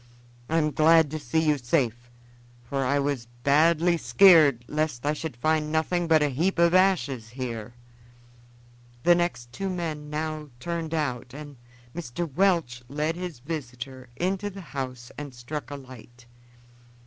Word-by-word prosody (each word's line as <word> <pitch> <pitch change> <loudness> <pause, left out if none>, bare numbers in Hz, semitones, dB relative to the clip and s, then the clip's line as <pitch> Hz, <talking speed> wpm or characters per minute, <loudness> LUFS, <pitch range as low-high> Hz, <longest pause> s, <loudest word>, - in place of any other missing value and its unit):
I'm 155 -1 +2
glad 160 0 +5
to 155 - -3
see 155 +4 0
you 150 -2 +3
safe, 120 -2 -1 0.5
for 135 +3 -2
I 140 +2 +1
was 140 -4 -1 0.2
badly 165 +4 +4
skeared 160 - +6
lest 150 -4 -2
I 150 - +2
should 155 -4 -6
find 155 +3 +1
nothing 170 +2 0
but 160 -2 +4
a 145 - +2
heap 165 +9 0
of 170 0 +4
ashes 175 - +2
here." 120 -2 -6 1.3
The 175 - +6
next 170 -9 -1
two 195 +6 -3
men 160 -5 -4
now 155 0 -4
turned 165 +2 -3
out, 125 -4 -3
and 145 -1 -9 0.4
Mr. 170 0 -4
Welch 170 -10 +1
led 150 +3 -1
his 175 -7 -6
visitor 130 -3 -7
into 195 +3 -1
the 195 0 -9
house 130 -3 -5
and 145 -3 -7
struck 125 +2 -6
a 145 - -5
light. 125 -2 -13
150 Hz, 150 wpm, -26 LUFS, 125-165 Hz, 1.3 s, skeared